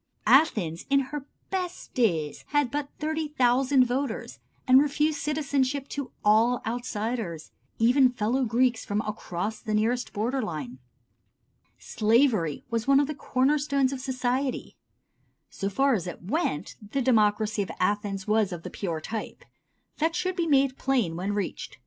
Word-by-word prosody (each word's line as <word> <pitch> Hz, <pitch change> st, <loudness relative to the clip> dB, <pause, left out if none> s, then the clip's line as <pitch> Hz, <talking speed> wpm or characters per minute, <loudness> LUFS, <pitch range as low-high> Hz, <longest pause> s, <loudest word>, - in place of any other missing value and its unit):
Athens 210 Hz, -, +3 dB
in 275 Hz, 0 st, +4 dB
her 295 Hz, -2 st, -5 dB, 0.2 s
best 365 Hz, -2 st, -4 dB
days 165 Hz, -, 0 dB
had 290 Hz, -4 st, +1 dB
but 290 Hz, 0 st, -3 dB
30,000 275 Hz, -4 st, +2 dB
voters, 250 Hz, -1 st, -3 dB, 0.3 s
and 260 Hz, +1 st, +7 dB
refused 295 Hz, +1 st, +1 dB
citizenship 280 Hz, -2 st, -1 dB
to 280 Hz, -4 st, -5 dB
all 225 Hz, +4 st, +4 dB
outsiders, 225 Hz, -7 st, -3 dB, 0.3 s
even 250 Hz, +3 st, +5 dB
fellow 245 Hz, +2 st, 0 dB
Greeks 245 Hz, 0 st, +1 dB
from 205 Hz, +1 st, -1 dB
across 210 Hz, -1 st, -4 dB
the 215 Hz, -1 st, -2 dB
nearest 235 Hz, +4 st, 0 dB
border 240 Hz, +6 st, -1 dB
line. 150 Hz, -, -5 dB, 1.0 s
Slavery 215 Hz, -, +1 dB
was 230 Hz, 0 st, -1 dB
one 275 Hz, 0 st, +6 dB
of 285 Hz, -, +3 dB
the 305 Hz, -, -4 dB
corner 275 Hz, +1 st, +1 dB
stones 275 Hz, -2 st, +1 dB
of 270 Hz, -, -5 dB
society. 260 Hz, 0 st, -2 dB, 0.8 s
So 195 Hz, -, -3 dB
far 270 Hz, +7 st, +2 dB
as 185 Hz, -5 st, -1 dB
it 175 Hz, -, -7 dB
went, 185 Hz, -, -2 dB
the 230 Hz, +6 st, -3 dB
democracy 215 Hz, -3 st, +2 dB
of 195 Hz, -, -4 dB
Athens 200 Hz, 0 st, -1 dB
was 210 Hz, -2 st, +2 dB
of 170 Hz, -2 st, -6 dB
the -, -, -7 dB
pure 170 Hz, -5 st, -3 dB
type. 220 Hz, +6 st, -6 dB, 0.5 s
That 325 Hz, +2 st, +1 dB
should 370 Hz, 0 st, -1 dB
be 340 Hz, -2 st, 0 dB
made 275 Hz, -3 st, +2 dB
plain 245 Hz, -11 st, +1 dB
when 190 Hz, +4 st, -2 dB
reached. 205 Hz, -3 st, -4 dB
245 Hz, 150 wpm, -27 LUFS, 210-275 Hz, 1.0 s, and